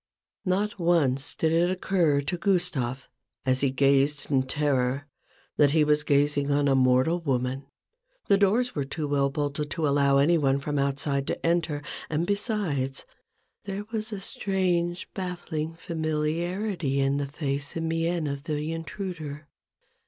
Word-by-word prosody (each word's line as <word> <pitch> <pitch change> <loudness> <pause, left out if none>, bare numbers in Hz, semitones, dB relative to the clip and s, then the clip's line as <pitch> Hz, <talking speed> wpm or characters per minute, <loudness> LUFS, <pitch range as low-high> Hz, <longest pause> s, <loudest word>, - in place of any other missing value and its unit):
Not 200 +2 0
once 150 -6 +2
did 160 - +1
it 170 +2 +3
occur 180 -6 +1
to 145 +5 -2
Gustave, 170 - 0 0.4
as 130 0 +2
he 140 - +3
gazed 140 +2 +2
in 135 -2 +4
terror, 135 -1 0 0.5
that 145 -1 +5
he 155 - +6
was 150 0 +2
gazing 145 0 +2
on 145 0 +2
a 135 - +4
mortal 130 +6 +3
woman: 135 -2 -1 0.6
the 200 - +4
doors 225 +5 +2
were 145 - -1
too 150 +2 -4
well 140 -1 +2
bolted 145 +1 -2
to 155 +2 -1
allow 140 -1 +3
any 165 +5 +4
one 135 -2 +2
from 145 +1 -2
outside 140 0 0
to - - -3
enter, 165 -3 0 0.3
and 160 +2 0
besides, 190 - -1 0.6
there 200 +1 -4
was 220 0 -2
a 205 - -4
strange 180 -3 0
baffling 170 -4 -4
familiarity 165 0 -1
in 135 +1 +2
the 140 -1 -2
face 140 -1 -3
and 165 0 -2
mien 165 0 0
of 140 -1 -4
the 150 0 -2
intruder. 160 -3 -6
150 Hz, 150 wpm, -27 LUFS, 140-175 Hz, 0.6 s, he